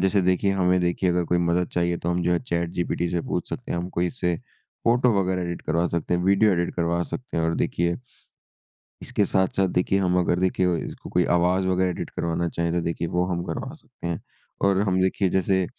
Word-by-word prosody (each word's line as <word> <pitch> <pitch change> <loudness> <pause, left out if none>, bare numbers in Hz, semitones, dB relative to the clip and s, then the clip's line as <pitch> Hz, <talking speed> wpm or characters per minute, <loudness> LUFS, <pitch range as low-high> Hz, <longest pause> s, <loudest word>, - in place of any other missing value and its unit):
जैसे 95 +1 +3
देखिए 95 +2 +2
हमें 90 -1 +2
देखिए 90 +1 +1
अगर 90 0 +1
कोई 90 +1 +1
मदद 85 0 +1
चाहिए 85 0 +1
तो 85 - -3
हम 85 0 0
जो 90 - +2
है 85 - +3
चैटजीपीटी 85 0 -1
से 85 - 0
पूछ - - -3
सकते - - -5
हैं। 85 - -1
हमको 90 0 -2
इससे 90 0 0 0.5
फोटो 120 +1 +4
वगैरह 90 -1 0
एडिट 85 -1 -4
करवा 85 +2 +1
सकते 85 +1 -1
हैं, 90 - +1
वीडियो 100 +3 +4
एडिट 85 -1 -1
करवा 85 0 0
सकते 125 +6 -6
हैं 80 - +1
और 80 0 +1
देखिए 85 0 0 1.1
इसके 105 - 0
साथ-साथ 95 0 +1
देखिए 90 +2 +1
हम 90 -1 +2
अगर 90 0 +1
देखिए 90 -1 +2
इसको - - -9
कोई 90 - +2
आवाज़ 90 +2 +2
वगैरह 95 0 +2
एडिट 90 - -4
करवाना 85 0 -1
चाहे 85 0 -1
तो 85 0 0
देखिए 85 0 -2
वो 90 - +3
हम 90 -1 -2
करवा 90 - -4
सकते 125 - -10
हैं। 85 -1 -3 0.4
और 100 -1 +3
हम 95 0 +2
देखिए 95 +1 +1
जैसे 95 0 +2
90 Hz, 215 wpm, -24 LUFS, 85-95 Hz, 1.1 s, फोटो